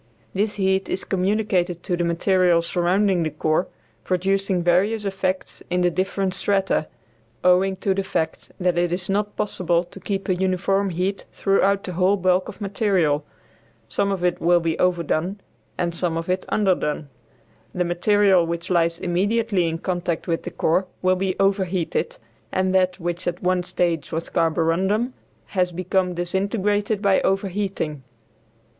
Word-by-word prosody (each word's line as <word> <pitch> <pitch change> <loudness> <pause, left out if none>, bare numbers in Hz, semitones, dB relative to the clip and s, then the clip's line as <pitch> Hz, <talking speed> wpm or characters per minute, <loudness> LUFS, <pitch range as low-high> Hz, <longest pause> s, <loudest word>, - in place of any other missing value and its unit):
This 205 +2 0
heat 190 -1 +1
is - - -2
communicated 185 -3 0
to 180 - -1
the 175 - -1
material 175 0 +3
surrounding 180 +2 +1
the 160 - 0
core, 155 +3 0 0.4
producing 190 0 0
various 200 +5 +2
effects 190 -1 -2
in 180 0 +1
the 175 0 +3
different 190 +1 -1
strata, 195 -6 0 0.6
owing 185 +2 +4
to 190 +1 0
the 195 +1 -1
fact 160 -4 -3
that 180 -1 +1
it 175 -1 +1
is 180 +1 -2
not 205 +1 0
possible 175 -4 0
to 180 +2 -12
keep 195 +1 -3
a 185 - +3
uniform 190 +2 +1
heat 185 +3 -2
throughout 195 0 +2
the 185 - -5
whole 185 +3 +3
bulk 185 0 +1
of - - -10
material. 195 -8 +1 0.7
Some 200 0 0
of 190 -2 -2
it 180 -1 0
will 175 +1 +4
be 165 -1 -1
"overdone" 180 +1 0 0.4
and 170 -1 -1
some 170 -1 -1
of 165 +2 -4
it 185 +1 -1
"underdone." 175 -7 0 0.6
The 180 -1 -1
material 190 +1 +3
which 170 +1 -4
lies 170 -1 +2
immediately 195 +1 +1
in 165 0 -2
contact 175 -1 -2
with 165 -1 0
the - - -5
core 185 +4 +1 0.2
will 185 0 +4
be 185 0 -1
overheated, 195 - 0 0.3
and 185 0 +1
that, 185 0 +2
which 175 +1 -3
at 175 +1 -3
one 180 0 +2
stage 170 -3 -1
was 165 0 -3
carborundum, 180 +9 +1 0.4
has 180 -2 +1
become 180 +1 0
disintegrated 200 +3 0
by 195 -1 +4
overheating. 195 -6 -1
185 Hz, 155 wpm, -23 LUFS, 175-195 Hz, 0.7 s, owing